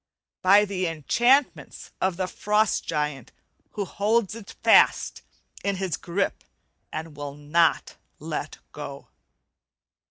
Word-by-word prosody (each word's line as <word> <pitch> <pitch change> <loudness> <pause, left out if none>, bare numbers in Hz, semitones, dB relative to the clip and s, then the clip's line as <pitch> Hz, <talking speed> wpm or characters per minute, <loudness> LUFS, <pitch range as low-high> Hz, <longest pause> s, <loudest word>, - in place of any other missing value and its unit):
By 200 +2 +6
the 185 -3 -2
enchantments 240 - +1
of 190 -2 0
the 185 - 0
frost 210 +1 0
giant 150 -4 -2 0.4
who 205 - -2
holds 210 +2 0
it 220 -2 -10
fast - - +4 0.4
in 200 -1 0
his 190 -3 -2
grip 190 - -2 0.5
and 155 -1 -6
will 145 -1 -6
not 155 +3 +1 0.2
let - - -5
it - - -28
go. - - -8
190 Hz, 120 wpm, -25 LUFS, 160-210 Hz, 0.5 s, By